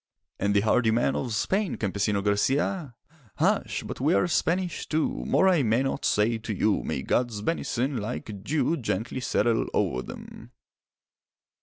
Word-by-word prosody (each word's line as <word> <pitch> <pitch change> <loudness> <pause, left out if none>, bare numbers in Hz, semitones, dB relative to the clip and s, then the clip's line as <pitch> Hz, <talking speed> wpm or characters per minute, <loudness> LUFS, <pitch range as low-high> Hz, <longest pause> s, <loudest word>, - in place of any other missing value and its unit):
'And 100 +1 +1
the 100 - +5
hardy 110 +2 +3
men 115 +2 +2
of 125 - -2
Spain, 190 - 0
Campesino 100 0 -1
Garcia?' 135 - 0 0.4
'Hush! - - 0
but - - -7
we - - +3
are 100 - +3
Spanish 175 +1 0
too; 155 0 -1
More 190 - +4
I 180 -5 +4
may 115 +1 +2
not 135 - -2
say 110 +2 +2
to 110 -1 -4
you: 105 +2 +2
May - - -3
God's 115 -4 0
benison, 130 -2 -1
like 105 -2 -5
dew, 150 +5 0
Gently 115 0 -2
settle 120 -2 +1
o'er 65 - +1
them. - - -10
115 Hz, 155 wpm, -26 LUFS, 105-145 Hz, 0.4 s, the